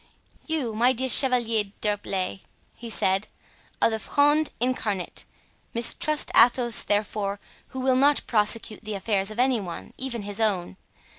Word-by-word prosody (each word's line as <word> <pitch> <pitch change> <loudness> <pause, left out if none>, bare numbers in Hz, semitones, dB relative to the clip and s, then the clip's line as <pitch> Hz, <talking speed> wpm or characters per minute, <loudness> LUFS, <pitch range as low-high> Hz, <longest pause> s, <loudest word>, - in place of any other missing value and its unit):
"You, 300 -8 -2
my 240 +4 +3
dear 260 +1 -2
Chevalier 240 -5 +5
d'Herblay," 195 -2 -2 0.3
he 235 - -9
said, 195 -1 0 0.5
"are - - +3
the 220 - -2
Fronde 295 +5 +2
incarnate. 220 -6 -2 0.5
Mistrust 295 +6 +1
Athos, 240 0 +5
therefore, 205 -1 -2 0.3
who 260 - -7
will 260 0 +2
not 285 +2 +3
prosecute 215 0 -1
the 215 -1 -5
affairs 195 0 -1
of 215 - -8
any 255 -1 +2
one, 175 -3 -8
even 250 -5 -4
his 205 +1 -6
own. 190 -4 -1
225 Hz, 140 wpm, -25 LUFS, 205-255 Hz, 0.5 s, Chevalier